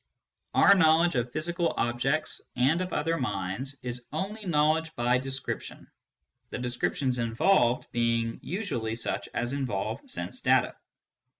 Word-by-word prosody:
Our 200 - +7
knowledge 170 -1 +4
of 120 -2 -1
physical 170 +3 -1
objects 130 +6 0
and 135 +8 +3
of 185 -1 -3
other 165 +2 0
minds 125 +4 -3
is 125 0 -4
only 210 +2 -4
knowledge 155 0 +2
by 125 +1 +2
descrip 135 +1 -3
tion, - - -11 0.6
the - - -4
descriptions 125 +1 -1
involved 120 +2 +2
being 115 -1 0
usually 135 - -3
such 120 - -3
as 120 +2 -1
involve 130 -9 -2
sense - - -4
data. - - +2
135 Hz, 130 wpm, -28 LUFS, 120-160 Hz, 0.6 s, Our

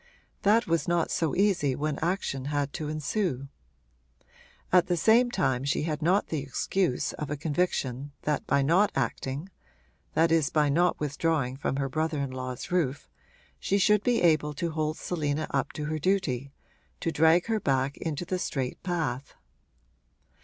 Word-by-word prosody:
That 215 +3 +4
was 165 +1 0
not 175 -1 +1
so 160 -4 0
easy 185 -9 +2
when 150 0 -2
action 160 -6 -2
had 145 -1 -1
to 155 -3 -4
ensue. 155 - -2 1.2
At 180 -1 +5
the 175 -1 +1
same 230 +8 +5
time 135 - 0
she 140 +1 0
had 155 -1 -2
not 185 +6 +2
the 155 - -1
excuse 140 +1 -1
of 150 - -5
a 150 - -2
conviction 145 -4 -1
that 150 -2 -1
by 140 0 +3
not 180 +8 +3
acting 135 +5 -2 0.7
that 165 +1 +3
is 160 -3 +3
by 150 -3 +2
not 175 +5 +2
withdrawing 145 -2 0
from 135 -1 -2
her 135 0 -1
brother 155 +3 -1
in 140 -2 -2
law's 130 +1 -6
roof 145 -7 0 0.5
she 200 - +1
should 210 +1 +4
be 240 -2 +1
able 155 -3 +3
to 170 +3 -2
hold 155 0 -1
Selina 155 -3 -2
up 135 - 0
to 150 - -4
her 155 +1 -2
duty, 145 -7 0 0.5
to 165 - -1
drag 160 +3 +4
her 225 -1 0
back 135 -4 0
into 160 +1 -3
the 185 +1 -2
straight 130 -7 -3
path. 160 -8 -3
155 Hz, 165 wpm, -28 LUFS, 140-175 Hz, 1.2 s, At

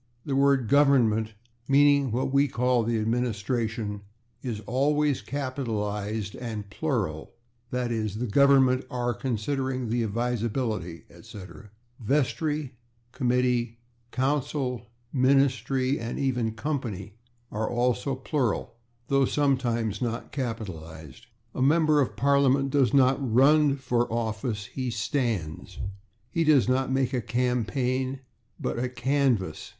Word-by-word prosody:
The 140 - -1
word 135 -3 +3
/Government/, 120 -6 +3 0.3
meaning 140 -1 +4
what 130 +3 -1
we 140 +1 +4
call 125 -1 +1
the 115 0 0
administration, 110 -1 -1 0.4
is 120 -5 -4
always 145 +4 +1
capitalized 110 -6 -3
and 110 -4 -5
plural, 105 - -2 0.4
/e. 125 -1 -1 0.3
g./, - - -6
"The 125 - -1
Government 130 +1 +4
/are/ 120 -1 -1
considering 130 +1 -2
the 120 +1 0
advisability, 110 - -2
etc." 105 +2 -12 0.3
/Vestry/, 145 +3 0 0.4
/committee/, 125 -2 +1 0.4
/council/, 130 -2 -1 0.3
/ministry/ 130 0 +2
and 115 +1 -4
even 125 -5 0
/company/ 115 -9 -4 0.4
are 110 +1 -2
also 125 +3 0
plural, 130 -4 -2 0.3
though 135 -1 +3
sometimes 125 -7 0
not 120 -1 -3
capitalized. 95 - -6 0.3
A - - -4
member 155 +1 +4
of 130 - -1
Parliament 140 0 +3
does 135 -3 +3
not 135 0 +4
/run/ 140 +4 +4
for 120 -3 0
office; 110 -2 -2
he 130 +2 -4
/stands/. 110 - -2 0.5
He 165 - +1
does 145 -8 +4
not 130 +1 +1
make 135 0 +1
a 125 - 0
/campaign/, 125 +2 -1 0.4
but - - -2
a 125 +1 -1
/canvass 125 - 0
125 Hz, 115 wpm, -27 LUFS, 115-135 Hz, 0.5 s, meaning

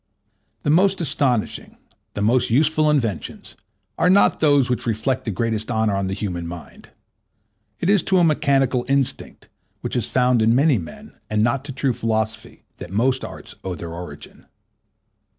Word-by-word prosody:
The 145 - +1
most 190 +4 +3
astonishing, 130 -8 -1 0.4
the 100 - -2
most 120 +4 +2
useful 155 +5 +3
inventions, 115 - -2 0.4
are 165 - +3
not 200 +2 +4
those 145 -4 +4
which 125 -1 -2
reflect 115 +4 -1
the - - -2
greatest 110 +2 -2
honour 110 -3 +1
on 100 -1 -1
the 95 - -3
human 90 -5 -4
mind. 85 -1 -10 0.9
It - - -2
is 200 -1 +4
to 190 - +4
a 175 - +4
mechanical 135 -5 +2
instinct, 140 -2 -1 0.3
which - - -4
is 120 -3 -1
found 125 -2 +2
in 115 +2 +3
many 140 -3 +3
men, 80 - -11
and 105 0 +1
not 120 +3 0
to 145 - -5
true 135 -1 -1
philosophy, 110 -1 -3
that 90 - -9
most 125 +7 +1
arts - - -8
owe 95 -2 -4
their 85 0 -7
origin. 90 +1 -10
125 Hz, 165 wpm, -21 LUFS, 110-140 Hz, 0.9 s, not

